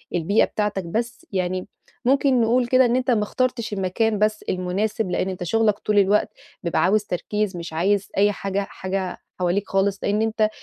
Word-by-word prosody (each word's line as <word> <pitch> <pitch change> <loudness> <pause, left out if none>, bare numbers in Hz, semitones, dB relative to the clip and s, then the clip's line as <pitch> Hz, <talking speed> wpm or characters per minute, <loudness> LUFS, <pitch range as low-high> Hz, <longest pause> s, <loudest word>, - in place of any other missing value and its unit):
البيئة 175 +5 +3
بتاعتك، 210 -2 -2
بس 230 +7 -3
يعني، 185 -1 -2 0.4
ممكن 270 -1 +3
نقول 240 +2 +2
كده، 255 +1 +5
إن 240 0 +2
أنت 255 0 +1
ما 215 -3 +2
اخترتش 240 0 -1
المكان 205 +3 0
بس 215 0 +1
المناسب، 195 +4 -1
لأن 185 - 0
أنت 185 -1 -5
شغَّالك 210 +3 +2
طول 210 -1 +2
الوقت 200 +2 +3 0.3
بيبقى 170 -2 +1
عاوز 210 +4 +3
تركيز، 205 +1 -2
مش 170 -1 -7
عايز 195 +4 +1
أي 205 +1 +4
حاجة 195 -1 -3
حاجة 190 0 -3 0.2
حواليك 180 +3 0
خالص. 195 0 +1
لأن 210 +1 +1
أنت 220 -1 +1
205 Hz, 175 wpm, -23 LUFS, 185-225 Hz, 0.4 s, كده